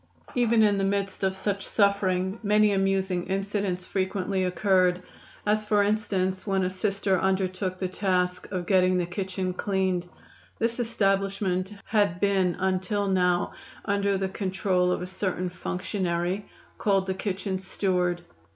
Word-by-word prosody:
Even 235 -2 +3
in 205 -2 +3
the - - +1
midst 195 0 -1
of 190 0 +1
such 200 0 -2
suffering 195 -1 +1
many 210 0 +4
amusing 190 -2 0
incidents 195 -1 -2
frequently 190 0 -1
occurred, 180 -1 +2 0.4
as 215 +1 +2
for 210 -1 +3
instance 200 -2 0
when 195 -1 +1
a 185 - 0
Sister 195 -1 0
undertook 185 0 0
the 185 - -2
task 180 -1 -1
of 180 -2 -2
getting 185 -1 +3
the 175 - +1
kitchen 185 +1 -3
cleaned. 185 -2 -1 0.5
This 230 +1 -1
establishment 195 -4 0
had 205 -5 +1
been 190 -3 +2
until 190 +2 0
now 180 -2 +2 0.3
under 200 -1 +1
the 190 0 -1
control 190 -2 0
of 180 - -1
a - - -3
certain 185 -1 -2
functionary 180 +1 -2 0.3
called 195 -2 +2
the 190 - -1
kitchen 190 0 -3
steward. 180 -2 0
190 Hz, 140 wpm, -27 LUFS, 185-200 Hz, 0.5 s, many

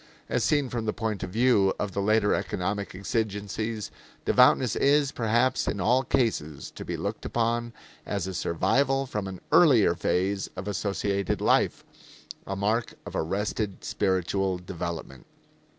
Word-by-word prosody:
As - - 0
seen 145 -3 +2
from 115 -2 -3
the 110 - 0
point 110 -4 -3
of 95 - -4
view 105 -2 +3
of 105 - -2
the 100 - -2
later 105 0 +3
economic 100 +2 -2
exigencies, 105 +2 -3 0.3
devoutness 125 -2 +4
is, 140 0 +3
perhaps 120 +2 +1
in 100 - -1
all 120 +7 +3
cases, 110 - -1
to - - -8
be - - -4
looked - - -4
upon 120 0 -1 0.3
as 100 -3 -3
a 95 - -4
survival 135 - +1
from 105 -6 -4
an 95 -2 -7
earlier 130 - +6
phase 95 +3 -1
of 95 +2 -6
associated 100 -1 -1
life - - +2 0.6
a 95 - -2
mark 110 +4 0
of - - -7
arrested 100 +4 -2
spiritual 95 -2 0
development. 85 -7 -6
105 Hz, 145 wpm, -27 LUFS, 95-115 Hz, 0.6 s, earlier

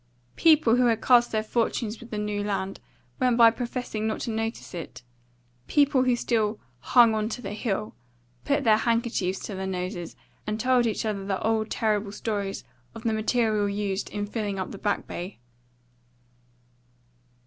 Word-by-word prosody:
People 305 -8 +5
who 250 -1 +4
had 225 -2 +2
cast 240 0 +4
their 215 -1 0
fortunes 225 0 -1
with 235 - -12
the 215 - -4
New 210 -1 -2
Land 195 -1 -3 0.4
went 250 -2 +2
by 230 -1 +8
professing 235 -2 -3
not 220 - -2
to 235 - -2
notice 225 +1 -4
it; 165 -7 -7 0.6
people 280 -3 +3
who 250 -1 +3
still 220 -3 0 0.2
"hung 235 - +5
on 215 0 -1
to 235 - -5
the 225 - -6
Hill" 210 -1 -2 0.5
put 285 - +1
their 220 -2 +5
handkerchiefs 230 -5 0
to 210 - -6
their 190 0 -4
noses, 180 -2 -4 0.3
and 215 +1 -2
told 250 0 +3
each 220 - -2
other 205 -3 -2
the 195 -1 -2
old 220 0 +1
terrible 210 -2 0
stories 205 -2 -3 0.3
of 225 - -9
the 225 - +1
material 215 -2 +1
used 200 -1 -2
in 205 0 -3
filling 205 -2 -3
up 185 - -4
the 200 - -8
Back 205 -1 -1
Bay. 180 +3 -6
220 Hz, 170 wpm, -26 LUFS, 205-235 Hz, 0.6 s, by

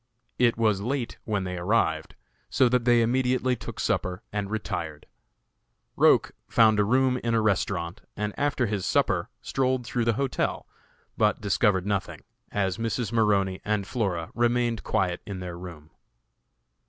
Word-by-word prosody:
It 120 -2 +3
was 110 -4 +2
late 125 +2 -3
when 105 -3 -1
they 90 -1 -4
arrived, 85 -5 0 0.3
so 130 - +4
that 125 -1 +1
they 120 -1 +5
immediately 130 +1 +1
took 115 - -8
supper 90 +4 -1
and 100 -2 -2
retired. 90 -8 -4 0.9
Roch - - +4 0.2
found 110 -2 +4
a - - +5
room 125 +4 +2
in 115 0 +1
a - - +4
restaurant, 95 -4 -1 0.2
and 105 0 -2
after 145 -3 0
his 100 -3 -2
supper - - +1
strolled 130 -2 0
through 120 0 -1
the 115 - +3
hotel, 135 -2 -1 0.5
but 105 -1 +2
discovered 100 -2 +2
nothing, 100 -1 -2 0.3
as 95 0 -1
Mrs. 115 -1 -2
Maroney 100 -4 +2
and 105 -2 -1
Flora 95 -7 -2
remained 120 -1 +1
quiet 90 -2 0
in 100 -2 -5
their 90 -1 -6
room. 85 -4 -10
105 Hz, 150 wpm, -26 LUFS, 95-120 Hz, 0.9 s, they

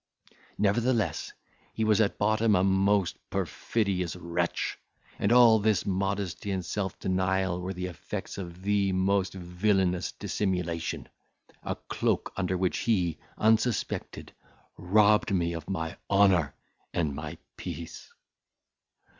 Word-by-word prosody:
Nevertheless, 105 - +1 0.4
he 110 - 0
was 110 0 +4
at 100 - +1
bottom 110 +1 +3
a 90 - +3
most 95 0 +2
perfidious 95 -6 -1
wretch, 85 -1 -2 0.4
and 100 - +1
all 120 -2 +7
this 105 0 +1
modesty 100 0 -2
and 95 -3 -2
self 95 +2 -3
denial 95 -1 0
were 95 +1 -4
the 90 +1 -3
effects 90 +2 -6
of 90 -1 -8
the 100 -1 +2
most 95 0 +1
villanous 90 -1 0
dissimulation, 90 -4 -2 0.5
a - - -3
cloak - - -1
under 95 -1 -1
which 90 -1 0
he, 90 -9 +1 0.2
unsuspected, 110 +2 0 0.4
robbed 105 +3 +3
me 85 -3 +1
of 85 +1 -7
my 80 -2 -3
honour 95 -7 +4 0.4
and 80 -5 0
my 75 +1 -6 0.2
peace. 85 -1 -7
95 Hz, 120 wpm, -28 LUFS, 90-105 Hz, 0.5 s, all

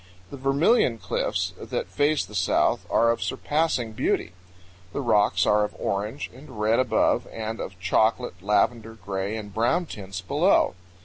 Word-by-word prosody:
The 140 - -7
Vermilion 135 - +3
Cliffs - - -2
that - - -3
face 145 +7 +1
the 100 - -15
south 95 -3 +1
are 115 0 +4
of 115 - -3
surpassing 150 -7 -1
beauty. 100 -4 -1 0.6
The - - -2
rocks 105 -7 +3
are 105 0 +3
of 105 - -4
orange 105 +7 -3
and 130 -4 -12
red 110 +3 +2
above 130 - +2
and 110 0 -5
of 95 -1 -7
chocolate, 110 +1 +1
lavender, 110 +3 +1
gray, 100 +1 -4
and 105 -2 -8
brown 120 - +1
tints 95 - -7
below. 90 - +2
110 Hz, 150 wpm, -25 LUFS, 100-130 Hz, 0.6 s, are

